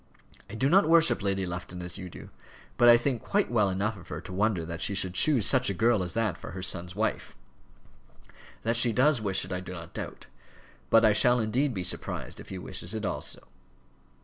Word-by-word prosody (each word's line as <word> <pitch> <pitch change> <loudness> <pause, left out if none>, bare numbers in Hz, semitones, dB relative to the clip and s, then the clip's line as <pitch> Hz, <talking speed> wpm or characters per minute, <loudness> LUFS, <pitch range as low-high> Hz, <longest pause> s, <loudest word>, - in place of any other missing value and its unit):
I 100 - -8
do 130 +5 +1
not 180 +2 +4
worship 165 -5 +4
Lady 95 -1 -1
Lufton 90 0 -6
as 90 0 -4
you 90 - -7
do; - - -12 0.4
but 120 - +5
I 120 - +8
think 120 -1 -2
quite 205 -7 0
well 105 -4 +2
enough 100 +3 -2
of 90 - -14
her - - -6
to 95 - -10
wonder 95 -3 0
that 85 0 -6
she 100 - +1
should 95 -2 0
choose 130 - +3
such 130 -3 +3
a 100 - -2
girl 115 +2 +2
as 90 +2 -4
that 115 -4 -1
for - - -9
her 90 0 -6
son's 90 -1 -3
wife. 110 +2 -3 1.3
That 115 +1 0
she 120 0 +3
does 130 0 +3
wish 95 -2 0
it, - - -11
I 90 - -2
do 90 0 -8
not 85 -2 -9
doubt. - - -7 0.6
But 115 0 +5
I 105 - +5
shall 125 +3 +4
indeed 120 +4 0
be 95 - -2
surprised 90 - -2
if - - -11
he 95 - -6
wishes 90 +2 -6
it 110 -1 -3
also." - - -4
105 Hz, 220 wpm, -28 LUFS, 90-120 Hz, 1.3 s, I